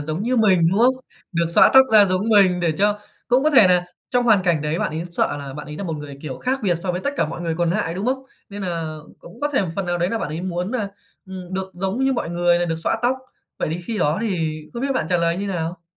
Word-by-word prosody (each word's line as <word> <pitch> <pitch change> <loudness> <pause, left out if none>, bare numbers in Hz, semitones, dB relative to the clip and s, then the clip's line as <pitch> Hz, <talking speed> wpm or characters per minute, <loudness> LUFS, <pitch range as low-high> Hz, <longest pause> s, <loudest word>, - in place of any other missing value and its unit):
giống 155 +5 -3
như 250 +3 0
mình, 205 -6 +4
đúng 195 - +1
không? 250 +3 +5 0.4
Được 170 -1 +1
xõa - - +6
tóc 265 - +10
ra 210 -2 +8
giống 190 +3 -1
mình 195 -5 +4
để 170 -2 +1
cho, 205 +1 +2 0.3
cũng 250 +2 +3
có 310 - +4
thể 265 -9 +7
nà 180 -1 +3 0.3
trong 245 -1 +2
hoàn 215 -5 +4
cảnh 170 -5 +1
đấy 155 +2 -1
bạn - - -1
ấy 160 +2 -4
sợ 170 - 0
là 140 -2 -7
bạn 150 - -7
ấy 150 0 -8
là 200 - -5
một 165 -3 -3
người, 145 -2 -9
kiểu, 140 -4 -6
khác 265 +1 -1
biệt 185 -4 +2
so 180 +2 -3
với 180 - -3
tất 280 - -1
cả - - +1
mọi 165 - -7
người 165 -2 -2
còn 170 0 0
nại, 175 -3 -1
đúng 195 +5 -3
không? 265 +1 -1 0.3
Nên 205 0 -8
nà 165 -4 -3 0.2
cũng 175 - -14
có 290 - 0
thể 265 - +2
một 185 - -3
phần 195 -2 -2
nào 175 0 -1
đấy 175 +2 0
là 230 - -1
bạn - - -3
ấy 155 +3 -4
muốn 180 +1 -3
nà, 225 -5 -2 0.4
ừm, 185 -1 -9
được 190 0 -3
giống 190 +3 -2
như 270 - +2
mọi 235 -9 -2
người 175 0 +2
là 175 - 0
được 165 -1 -2
xõa 165 - -1
tóc. 250 +2 +2 0.4
Vậy - - -1
thì 170 - -4
khi 220 +3 -3
đó 150 -1 +1
thì 165 -8 -2
không 235 - -5
biết 275 0 0
bạn 160 - -1
trả 180 - +2
lời 170 0 +1
như 200 +2 -3
nào? 170 -2 -4
180 Hz, 295 wpm, -21 LUFS, 165-210 Hz, 0.4 s, tóc